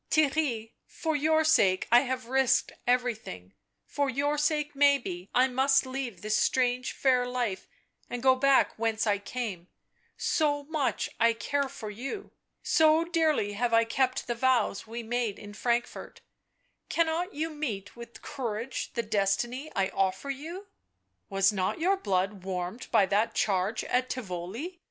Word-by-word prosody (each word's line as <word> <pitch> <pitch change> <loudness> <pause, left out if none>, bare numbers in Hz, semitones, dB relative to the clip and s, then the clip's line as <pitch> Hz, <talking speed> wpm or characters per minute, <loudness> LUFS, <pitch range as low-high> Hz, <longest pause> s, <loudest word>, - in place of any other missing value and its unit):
" - - -49
Theirry 275 -7 +1
— - - -53
for 320 -2 0
your 315 +2 +3
sake 195 -13 +3
I 240 - +8
have 255 -1 -3
risked 265 +1 +2 0.2
everything, 225 - -1 0.3
for 285 -1 -1
your 285 +3 0
sake 300 0 0
maybe 270 -11 +2
I 255 +1 +4
must 270 +1 +3
leave 260 -7 -5
this 215 0 0
strange 250 0 +1
fair 250 -2 +2
life 245 -6 -2 0.4
and 245 0 -5
go 260 -1 +6
back 275 +1 +3
whence 225 -1 0
I 205 -2 +1
came 205 -6 -5 0.3
— - - -40
so 290 -2 +1
much 300 -2 -1
I 230 0 +4
care 280 +4 -1
for 215 -4 -7
you, 270 - -6 0.3
so 315 0 +4
dearly 315 - +1
have 230 +2 +1
I 230 - +5
kept 255 +3 0
the 240 - -1
vows 240 -4 +1
we 230 +1 -6
made 235 -2 -2
in 205 0 -10
Frankfort 240 +2 -2 0.3
— - - -46
cannot 335 +2 0
you 320 +2 -2
meet 225 -11 -5
with 235 0 -11
courage 240 -3 -4
the 235 - -1
destiny 220 +8 -1
I 195 -2 +1
offer 190 +8 -1
you? 330 +9 -7 0.6
"Was 195 0 +3
not 190 - -1
your 375 +4 +3
blood 195 - -1
warmed 185 +4 -4
by 200 - +4
that 205 +4 0
charge 200 +2 0
at 250 +1 0
Tivoli? 230 - -5
245 Hz, 160 wpm, -28 LUFS, 210-285 Hz, 0.6 s, I